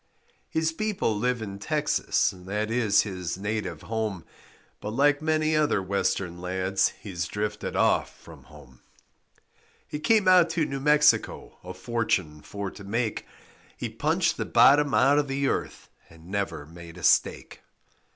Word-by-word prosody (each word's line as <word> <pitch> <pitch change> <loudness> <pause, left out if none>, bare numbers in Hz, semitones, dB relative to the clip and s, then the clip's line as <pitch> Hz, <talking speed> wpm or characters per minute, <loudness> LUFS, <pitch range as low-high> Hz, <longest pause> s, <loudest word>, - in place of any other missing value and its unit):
His 160 0 0
people 195 - -1
live 120 +2 -1
in 100 -2 -7
Texas, 150 +7 0
That 105 +4 -4
is 115 -4 +3
his 90 -4 -5
native 100 -5 -4
home, 110 -6 -3 0.5
But 105 - -5
like 145 +2 +3
many 155 0 +1
other 150 -8 +2
Western 95 -2 -2
lads 95 +1 0
He 100 - -9
drifted 105 +5 -3
off - - +2
from - - -15
home. 65 -1 -17 1.1
He 150 - -5
came 205 +5 +2
out 180 -2 +6
to 160 - +2
New 135 -1 -4
Mexico 150 +1 +2
A 90 +1 -8
fortune 95 -8 -2
for 100 +2 -6
to 100 - -12
make, 110 +3 -2 0.5
He - - -4
punched - - 0
the - - -2
bottom 145 0 +5
out 140 +2 +4
of 145 - -1
the 135 +1 -1
earth - - -3 0.2
And 80 +1 -16
never 100 -7 -3
made 85 +2 -12
a 90 - -11
stake. - - +1
105 Hz, 150 wpm, -26 LUFS, 95-145 Hz, 1.1 s, out